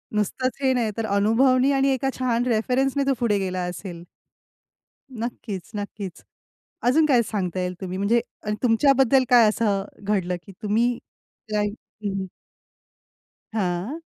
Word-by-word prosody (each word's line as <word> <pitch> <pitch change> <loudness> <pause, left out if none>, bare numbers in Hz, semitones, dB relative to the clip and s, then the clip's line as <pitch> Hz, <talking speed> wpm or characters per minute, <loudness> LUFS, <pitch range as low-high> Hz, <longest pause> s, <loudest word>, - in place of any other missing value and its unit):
नुसतंच 225 +5 -1
हे 265 -1 +3
नाही 235 -4 0
तर 225 - -1
अनुभवनी 255 +6 +4
आणि 275 0 +3
एका 265 +1 0
छान 245 -2 +1
रेफरन्सने 255 +4 +1
तो 275 - +4
पुढे 225 -4 +2
गेला 185 -1 -2
असेल. 175 -2 -7 1.1
नक्कीच, 225 -5 -5
नक्कीच. 205 -2 -6 0.6
अजून 305 +6 +4
काय 250 -5 +4
सांगता 190 -5 -2
येईल 180 0 -2
तुम्ही? 185 -1 -4
म्हणजे 220 +4 +3 0.2
अ 210 - -3
तुमच्याबद्दल 265 +2 +4
काय 240 -3 +7
असं 210 -3 +1 0.2
घडलं 190 -3 0
की 195 - -11
तुम्ही 230 +3 +1 0.5
काही 210 -1 +1 0.3
हं. 195 -1 -2 1.3
हां. 195 - -2
225 Hz, 130 wpm, -24 LUFS, 200-255 Hz, 1.3 s, काय